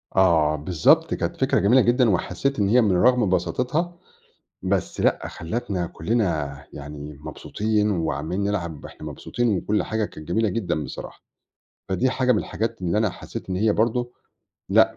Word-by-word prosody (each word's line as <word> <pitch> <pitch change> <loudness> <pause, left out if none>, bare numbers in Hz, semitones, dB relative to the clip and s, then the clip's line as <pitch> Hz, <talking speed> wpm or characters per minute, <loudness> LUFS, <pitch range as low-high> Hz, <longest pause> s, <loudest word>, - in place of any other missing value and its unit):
آه 80 -5 +4
بالضبط 75 +2 +3
كانت - - -2
فكرة - - +2
جميلة 120 +7 +5
جدًا، 120 0 +3
وحسّيت 105 +8 0
إن 100 - +3
هي 125 +2 +5
من 105 -4 +3
رغم 120 +1 +4
بساطتها، 150 - 0 0.6
بس - - -1
لأ - - +1
خلّتنا 90 0 -3
كلّنا 80 - -1
يعني 75 0 -8
مبسوطين، 105 +5 -1
وعَمّالين 85 +2 -1
نلعب 85 -7 -2
وإحنا - - -9
مبسوطين 120 -5 -1
وكلّ 105 +3 0
حاجة 110 -1 -1
كانت 75 -5 -11
جميلة 110 +4 +1
جدًا 85 -7 -1
بصراحة، 65 - -8 0.7
فدي 95 +8 +1
حاجة 130 -1 +2
من - - +2
الحاجات 115 0 -3
اللي 90 +4 +1
أنا 110 -3 +2
حسّيت 95 - -8
إن 90 - -1
هي 105 +2 +3
برضه، 120 +2 0 0.6
لأ - - +4
100 Hz, 155 wpm, -24 LUFS, 85-115 Hz, 0.7 s, جميلة